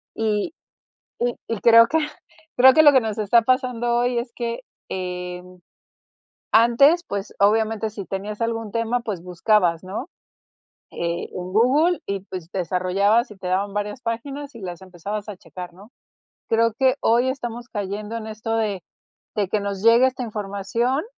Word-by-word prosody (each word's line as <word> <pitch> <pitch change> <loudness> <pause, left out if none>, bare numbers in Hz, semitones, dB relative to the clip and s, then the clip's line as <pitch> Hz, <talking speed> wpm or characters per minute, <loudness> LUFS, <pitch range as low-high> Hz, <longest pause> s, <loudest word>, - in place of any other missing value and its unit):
y 215 +5 -1 0.7
y 240 0 0
y 230 -3 -3
creo 230 0 +7
que 320 +6 +1 0.6
creo 260 +1 +8
que 315 - +7
lo 290 -1 +8
que 260 - +5
nos 220 -3 -3
está 215 +3 +4
pasando 245 -1 +1
hoy 245 0 +1
es 235 0 -4
que, 235 +1 -3 0.3
eh 180 -1 -4 1.1
antes, 275 +10 +5
pues 200 0 -4
obviamente 220 +1 +2
si 205 -2 -7
tenías 200 +3 -5
algún 225 -2 -2
tema, 230 +2 0
pues 200 -7 -5
buscabas, 180 -1 +1
¿no? 200 - -5 0.8
en 170 0 -3 0.2
Google 285 - +3
y 200 -1 -2
pues 180 -3 -6
desarrollabas 195 - +1
y 210 - -11
te 185 -1 -6
daban 195 +2 -1
varias 205 +3 -3
páginas 275 +4 -5
y 230 - -10
las 175 -2 -6
empezabas 195 +3 -6
checar, 180 -1 -9
¿no? 205 +6 -16 0.6
Creo 230 0 +3
que 260 0 +4
hoy 240 +3 +3
estamos 240 -2 -5
cayendo 210 +1 -4
en 220 - -6
esto 220 +1 -3
de 205 -5 -1 0.6
de 205 - +1
que 210 - +1
nos 200 -1 -4
llegue 235 +3 +6
esta 255 -1 -4
información 215 +5 -2
220 Hz, 155 wpm, -23 LUFS, 195-240 Hz, 1.1 s, creo